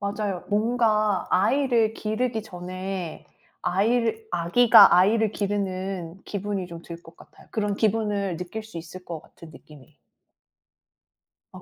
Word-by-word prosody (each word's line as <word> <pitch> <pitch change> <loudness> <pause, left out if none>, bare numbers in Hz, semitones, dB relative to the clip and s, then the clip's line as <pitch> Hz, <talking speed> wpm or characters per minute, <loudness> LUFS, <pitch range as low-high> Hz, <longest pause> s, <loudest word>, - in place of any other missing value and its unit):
맞아요. 200 -2 -3
뭔가 215 -2 +1
아이를 230 +2 +2
기르기 220 +1 -2
전에 185 -2 -6 0.4
아이를 225 +3 0
아기가 175 +6 +6
아이를 215 +4 +3
기르는 190 -3 -3
기분이 200 -2 -4
좀 170 -1 -9
들 170 0 -9
것 165 0 -16
같아요. - - -18
그런 205 -2 -1
기분을 205 -4 0
느낄 180 +5 -6
수 220 -5 -10
있을 170 +3 -9
것 165 -2 -6
같은 165 - -15
느낌이. 150 -2 -17 1.5
아 - - -12
200 Hz, 265 characters per minute, -25 LUFS, 180-220 Hz, 1.5 s, 아기가